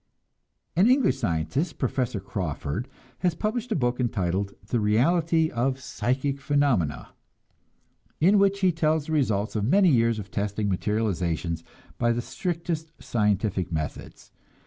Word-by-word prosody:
An 190 +7 +5
English 255 - +3
scientist, 115 - -1
Professor 125 -4 -1
Crawford, 90 - -4 0.3
has 175 -2 +1
published 225 +6 -2
a - - +2
book 125 -3 0
entitled 100 -4 -1
"The 120 +3 0
Reality 160 +10 +2
of 130 +3 0
Psychic 130 +3 -2
Phenomena," 125 - +1 1.1
in 195 +6 +5
which 200 0 +2
he 185 -1 +4
tells 155 -2 +1
the 160 - -6
results 110 -10 0
of 105 - 0
many 185 - +4
years 115 -5 +3
of 100 -2 -7
testing 100 +1 -1
materializations 90 -5 -1 0.4
by 120 0 +3
the 120 - -1
strictest 165 -2 -3
scientific 105 -4 0
methods. 80 -2 -5
120 Hz, 130 wpm, -26 LUFS, 100-160 Hz, 1.1 s, An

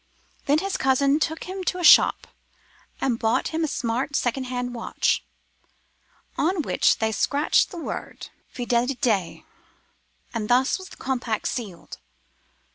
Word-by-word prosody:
Then 290 +2 +4
his 390 +4 -2
cousin 275 +2 +2
took 320 0 -2
him 375 +1 -6
to 365 - -1
a 355 - -4
shop, - - +6 0.7
and 245 -4 0
bought 225 0 +1
him 325 0 -2
a - - +1
smart 260 +1 -2
second 260 +1 0
hand 245 -1 -4
watch, 235 - -1 1.2
on 350 -1 +1
which - - +2
they 220 0 0
scratched 285 +7 +2
the 360 - -9
word 330 - -6 0.2
Fidelite, 240 -5 -1 0.9
and 215 -2 -3
thus 255 +8 +3
was 375 - -10
the - - -14
compact 245 -4 -2
sealed. 205 -9 -6
260 Hz, 135 wpm, -24 LUFS, 235-310 Hz, 1.2 s, shop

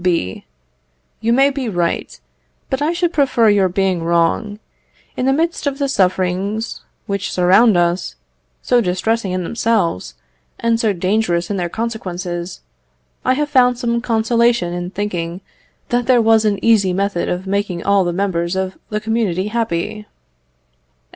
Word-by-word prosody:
B. 170 - -1 0.7
You 230 - 0
may 270 +3 +4
be 270 -4 -3
right, 175 -4 -2 0.5
but 265 - -1
I 300 +3 +2
should 345 0 -1
prefer 265 -6 +3
your 200 -2 +3
being 190 -1 0
wrong. 170 +5 +1 0.6
In 255 - -1
the - - +4
midst 325 +2 0
of 280 -1 -1
the 280 -1 0
sufferings 190 0 -1 0.2
which 200 -2 -3
surround 190 +4 +4
us, 175 - 0 0.5
so 245 -1 +3
distressing 195 +2 -1
in 185 0 -2
themselves, 210 - -1 0.4
and 230 0 +1
so 220 -2 +2
dangerous 185 -1 0
in 200 - -1
their 175 -2 -2
consequences, 180 -5 -4 0.6
I 255 - +2
have 295 +1 -1
found 250 -3 +4
some 235 -1 -1
consolation 230 -4 +1
in 175 0 -4
thinking 180 -3 -4 0.5
that 245 -1 0
there 255 -2 +5
was 225 -1 +4
an 205 -2 +2
easy 205 -5 +4
method 195 -2 -1
of 180 +2 -3
making 195 -3 -2
all 200 -1 +3
the 175 - -1
members 175 -1 -1
of 190 0 -3
the 210 - -1
community 210 -4 -1
happy. 210 -1 -2
205 Hz, 150 wpm, -18 LUFS, 180-235 Hz, 0.7 s, there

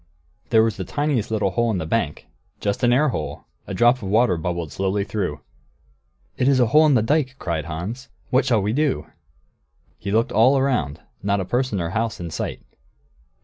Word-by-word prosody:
There 110 -1 +5
was 115 -1 0
the - - -3
tiniest 145 -7 -1
little 105 -3 0
hole 120 +3 +1
in 105 - 0
the 80 - -3
bank. 80 -4 -1 0.3
Just 100 -1 -2
an 120 - +4
air 145 +5 +4
hole. 75 - -4 0.2
A - - -4
drop 120 +2 +4
of 100 -6 -6
water 110 -2 +3
bubbled 85 -1 -3
slowly 95 +1 -1
through. 90 -9 -3 1.0
"It 125 - +1
is 135 -2 +4
a 125 - +5
hole 155 +7 +5
in 145 - +4
the 110 - +3
dike!" 135 +1 +1
cried 85 - -3
Hans. 95 - -6 0.2
"What 130 +2 +4
shall 115 -6 +2
we 105 +2 0
do?" 130 - 0 0.9
He - - -5
looked 110 +3 +1
all 130 +5 +4
round; 85 - 0 0.2
not 100 +1 0
a 95 - -2
person 125 -2 -1
or 85 -1 -2
a - - -7
house 110 +1 -2
in 85 -2 -6
sight. - - -4
110 Hz, 200 wpm, -22 LUFS, 90-125 Hz, 1.0 s, There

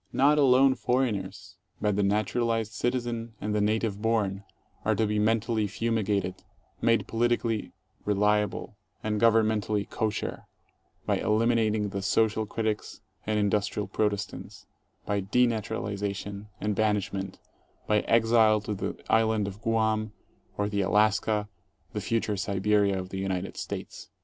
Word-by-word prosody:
Not 145 +3 +4
alone 135 -1 +6
foreigners, 125 -7 -2 0.2
but 105 -2 +1
the 105 - +1
naturalized 110 +2 0
citizen 120 -1 -2
and 105 0 -2
the 105 - +1
native 105 -1 0
born 105 -4 0 0.4
are - - +2
to 110 - +1
be 105 0 0
mentally 110 0 +1
fumi 115 +2 -1
gated, 95 -2 -1 0.4
made 115 0 +3
politically 115 -1 0 0.3
"reliable" 105 0 0 0.3
and 105 -1 -1
governmentally 110 -2 +2
kosher, 110 -2 -3 0.6
by - - +1
eliminating 110 -1 +2
the 100 0 -4
social 110 +2 +1
critics 110 0 -3 0.3
and 110 0 +1
industrial 105 0 0
protestants, 105 -2 -3 0.4
by 100 -1 0
denatural 115 +2 +1
ization 100 +1 -4
and 105 0 -1
banishment, 100 -2 -1 0.5
by 105 0 +3
exile 115 -1 +4
to 105 0 -3
the 100 - -4
Island 110 -2 +2
of 100 +1 -8
Guam 110 -1 0 0.4
or 105 - 0
to 100 -1 -1
Alaska, 105 +1 +2 0.5
the 105 - -3
future 110 -2 -1
Siberia 100 0 +1
of 95 0 -6
the 95 - -5
United 95 -1 -3
States. - - -6
105 Hz, 130 wpm, -28 LUFS, 100-115 Hz, 0.6 s, alone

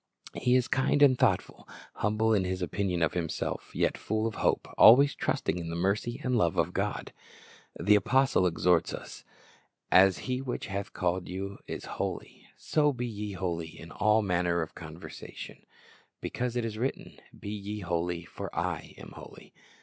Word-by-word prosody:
He 125 0 +2
is 125 -2 +3
kind 145 0 +2
and 135 -3 +7
thoughtful, - - 0 0.3
humble 110 +2 +2
in 100 -3 +3
his 90 0 -2
opinion 90 -1 -1
of 75 - +1
himself, 85 -3 -3
yet - - +1
full 110 +1 -1
of 115 - -1
hope, - - 0
always 140 +5 +8
trusting 90 - -1
in 85 -1 -5
the 85 - -4
mercy 100 +7 -1
and 125 -1 +1
love 85 -8 +2
of - - +1
God. - - -2 0.7
The 100 +4 +4
apostle 105 -1 +3
exhorts 85 0 +2
us, - - -10 0.7
"As 95 0 +6
He 130 0 -1
which 130 -2 -4
hath 100 0 -4
called 90 0 -1
you 100 +2 -5
is - - -6
holy, - - -5
so 150 -1 +2
be 125 -2 -4
ye 105 -3 -5
holy 85 -4 -4
in 80 0 -11
all 105 +1 +3
manner 90 -3 +1
of 80 - -9
conversation; - - -10 0.5
because 125 -1 -3
it 120 -1 0
is 110 -1 -5
written, 130 +3 -4 0.2
Be 100 - -6
ye 105 0 -5
holy; 85 -1 -2
for - - -7
I - - -3
am - - -11
holy." - - -13
100 Hz, 170 wpm, -29 LUFS, 90-120 Hz, 0.7 s, always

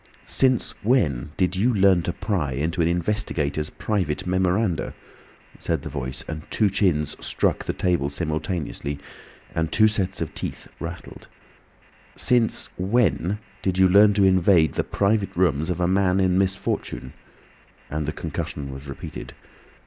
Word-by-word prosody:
"Since 130 -3 +2
when 75 - +1
did 95 -1 +1
you 110 +7 +2
learn 95 -3 +5
to 85 - -2
pry 85 -11 -1
into 80 +7 -1
an 80 - +3
investigator's 85 -5 -1
private 95 -5 -2
memoranda," 90 0 0 0.6
said - - -1
the - - -5
Voice; 65 -2 -4
and 80 -1 -5
two 105 -3 +2
chins 85 -7 +1
struck - - 0
the - - -1
table 85 -6 0
simultaneously, 75 -1 -3 0.6
and 80 -1 -1
two 110 -1 +5
sets 95 -3 -1
of - - -3
teeth - - -5
rattled. 85 +1 -8 0.9
"Since 120 -3 +2
when 95 - +1 0.2
did 95 -1 -1
you 95 0 +6
learn 100 +2 +6
to 100 - +4
invade 90 -4 +4
the - - 0
private 100 0 0
rooms 80 -3 +1
of 90 -1 -1
a 90 - +2
man 95 0 +2
in 95 -1 +3
misfortune?" 95 -8 -1 0.7
and 75 -1 -3
the - - 0
concussion 70 -2 -5
was 70 +2 -9
repeated. 70 - -8
90 Hz, 145 wpm, -24 LUFS, 75-100 Hz, 0.9 s, you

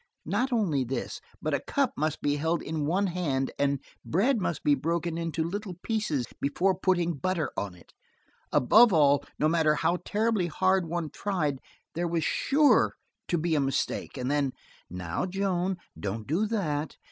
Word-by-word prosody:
Not 260 +1 0
only 185 - +1
this, 125 0 -4 0.2
but - - 0
a - - +2
cup - - 0
must 155 0 -2
be 145 0 +1
held 160 +3 0
in 155 -2 -2
one 190 +5 +2
hand, 160 -8 -1
and 140 -1 +2 0.2
bread 225 - +2
must 170 -4 -2
be 145 - +4
broken 165 +4 -1
into 165 -1 -2
little 190 +2 -4
pieces 210 - -1 0.2
before 180 +7 +2
putting 175 -2 +1
butter 175 +1 -1
on 100 -3 -3
it. 85 - -19 0.6
Above 220 - +6
all, 145 -4 +4
no 155 - +2
matter 155 -2 +3
how 175 +3 +1
terribly 215 -3 +1
hard 185 +1 +2
one 165 -2 -3
tried, 155 -9 -1 0.3
there 175 +1 -1
was 165 -1 0
sure 290 - +3 0.3
to 175 - +1
be 165 +1 0
a 155 - +3
mistake, 135 0 -1
and 125 +1 -2
then: 140 -3 +1 0.4
"Now, 90 - -3
Joan, 190 -1 -1 0.2
don't 105 +2 -4
do 180 - +1
that. 160 -9 -2
165 Hz, 170 wpm, -28 LUFS, 145-190 Hz, 0.6 s, Above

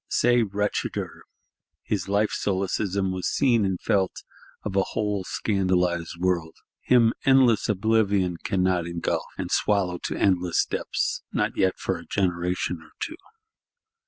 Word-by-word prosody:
Say, 120 0 +3
wretcheder! 105 -1 -2 0.6
His 105 -3 -2
Life 100 +1 +2
solecism 95 0 -1
was 95 -1 -2
seen 120 -6 +2
and 95 -2 -1
felt 95 -2 0 0.4
of 100 -2 -4
a 100 - +4
whole 105 -1 -2
scandalised 90 -4 0
world; 85 -3 0 0.2
him 120 -2 +4
endless 130 -5 +4
Oblivion 100 -3 +2
cannot 90 -2 +1
engulf, 85 0 -2
and - - -4
swallow 95 -4 +1
to - - -3
endless 90 -3 +2
depths,—not - - -2
yet 95 -1 +1
for 95 -3 -2
a 85 - -12
generation 90 -2 -1
or 80 - -18
two. - - -3
95 Hz, 130 wpm, -25 LUFS, 90-105 Hz, 0.6 s, a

